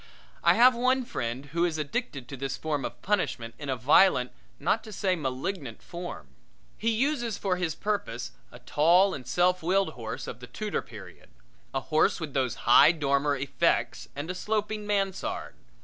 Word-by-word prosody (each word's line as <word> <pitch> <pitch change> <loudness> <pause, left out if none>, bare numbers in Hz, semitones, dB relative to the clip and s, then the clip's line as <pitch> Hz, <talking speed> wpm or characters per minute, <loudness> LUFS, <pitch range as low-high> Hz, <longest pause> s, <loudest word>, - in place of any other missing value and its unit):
I - - +6
have 250 +2 +7
one 255 +1 +1
friend 120 - -4
who 170 +1 +1
is 170 -3 0
addicted 150 - -3
to 135 - -7
this 135 +1 -4
form 150 -3 -2
of - - -6
punishment 155 - -1
in 145 -2 -6
a 130 - +1
violent, 130 +1 +4 0.3
not 190 +9 +1
to 215 - -9
say 190 -2 0
a - - +1
malignant 140 - -4
form. 175 +1 -7 0.5
He 230 - -1
uses 240 -2 0
for 190 -2 0
his 175 -4 -2
purpose 125 - -3 0.2
a - - -11
tall 165 +10 +3
and 130 -3 -7
self 180 +5 +2
willed 190 +2 +2
horse 120 -6 -6
of 120 - -7
the 125 - -10
Tudor 210 - -3
period - - -13 0.4
a 135 - -1
horse 155 +4 +2
with 155 -5 -5
those 130 -3 0
high 120 +6 +8
dormer 145 -2 +1
effects 140 0 0
and 145 +3 -4
a - - -4
sloping 210 +2 -2
mansard. 195 -2 -2
160 Hz, 180 wpm, -28 LUFS, 135-200 Hz, 0.5 s, high